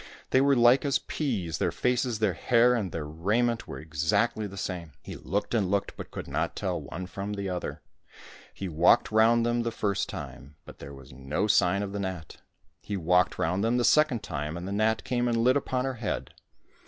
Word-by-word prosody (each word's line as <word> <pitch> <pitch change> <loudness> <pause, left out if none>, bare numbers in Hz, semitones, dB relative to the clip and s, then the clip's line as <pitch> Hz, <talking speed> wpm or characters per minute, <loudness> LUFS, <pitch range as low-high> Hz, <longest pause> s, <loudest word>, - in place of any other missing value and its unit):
They 130 - +5
were 140 0 +4
as - - +2
Uke 120 +3 +5
as 140 - +2
peas, 105 - -3
their - - +1
faces, 125 -1 0
their 105 -3 +1
hair, 120 +7 +3
and 105 -7 -1
their 80 -2 -4
raiment 110 +10 0
were - - -7
exactly 80 +8 0
the 100 0 -10
same. 90 -5 -5
He - - -8
looked 100 +6 -3
and 105 -6 +1
looked, 100 0 -1
but - - -8
could - - -7
not - - -2
tell - - -2
one 90 +4 -7
from 100 +2 -5
the 100 -1 -3
other. 90 -1 -5 0.7
He 95 - -6
walked 85 +9 +3
round 115 +2 +4
them 120 0 +1
the 115 - -1
first 100 -3 -1
time, 70 +2 -8
but - - -13
there 70 0 -9
was 70 0 -14
no 70 +9 -2
sign 100 -1 +3
of 100 - -5
the 100 - -4
gnat. 95 -5 -5 0.4
He 100 - -4
walked 90 +1 +2
round 90 +2 0
them 115 +2 +2
the 120 - +1
second 130 -1 +3
time, 75 0 -4
and 90 +2 -6
the - - -4
gnat 110 +2 +1
came 120 -1 0
and 120 -1 +1
lit 125 +3 +3
upon 130 -2 -1
her 135 - -2
head. 105 - -3
100 Hz, 215 wpm, -28 LUFS, 90-120 Hz, 0.7 s, They